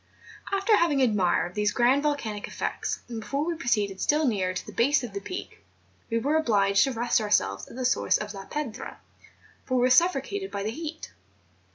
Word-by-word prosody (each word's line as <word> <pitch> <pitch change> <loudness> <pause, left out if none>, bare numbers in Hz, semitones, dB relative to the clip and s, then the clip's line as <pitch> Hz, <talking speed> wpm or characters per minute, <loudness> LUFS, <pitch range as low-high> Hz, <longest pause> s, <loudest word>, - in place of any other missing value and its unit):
After 395 +2 +3
having 315 -5 +2
admired 195 -7 +2
these 210 +1 +1
grand 250 +4 +3
volcanic 235 -9 -2
effects, - - -3
and 235 -2 -5
before 280 +7 -2
we 340 - -1
proceeded 210 - -1
still 300 +1 +2
nearer 195 -7 +1
to 185 - -5
the - - -9
base 275 +4 +2
of 230 -5 -6
the 200 - -3
Peak, 365 - -8 0.5
we 230 - 0
were 285 +7 +1
obliged 205 -8 +3
to 270 - -2
rest 240 -1 +1
ourselves 100 - 0
at - - -12
the 255 0 -3
source 250 - +2
of 210 0 -6
La 195 -1 -8
Piedra, 290 -7 -5 0.6
for 255 - -2
we 250 - +3
were 250 +1 +3
suffocated 355 +6 +2
by 200 - -4
the 215 - -2
heat. 315 +4 -7
240 Hz, 195 wpm, -26 LUFS, 205-295 Hz, 0.6 s, After